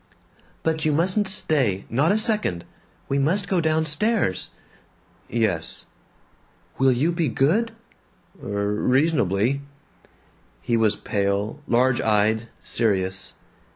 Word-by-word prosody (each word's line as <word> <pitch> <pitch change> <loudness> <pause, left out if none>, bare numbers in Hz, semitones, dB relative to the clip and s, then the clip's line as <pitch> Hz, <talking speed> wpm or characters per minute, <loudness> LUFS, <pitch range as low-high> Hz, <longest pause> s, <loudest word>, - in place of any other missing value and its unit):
"But 160 -1 0
you 155 - +2
mustn't 185 +6 +1
stay, 135 - 0
not 140 - +2
a 205 - +3
second. 210 - +1 0.4
We 140 - 0
must 180 +8 +1
go 185 -2 +1
downstairs." 160 - 0 0.8
"Yes." 105 -9 -1 0.9
"Will 135 0 +5
you 135 +7 +1
be 170 -2 0
good?" 195 - +1 0.7
"R 100 0 -2
reasonably!" 125 - +1 1.0
He 120 - 0
was 110 -2 +3
pale, 100 +6 -2
large 125 +1 +2
eyed, 110 +1 +2 0.2
serious. 95 -4 0
130 Hz, 105 wpm, -23 LUFS, 105-160 Hz, 1.0 s, Will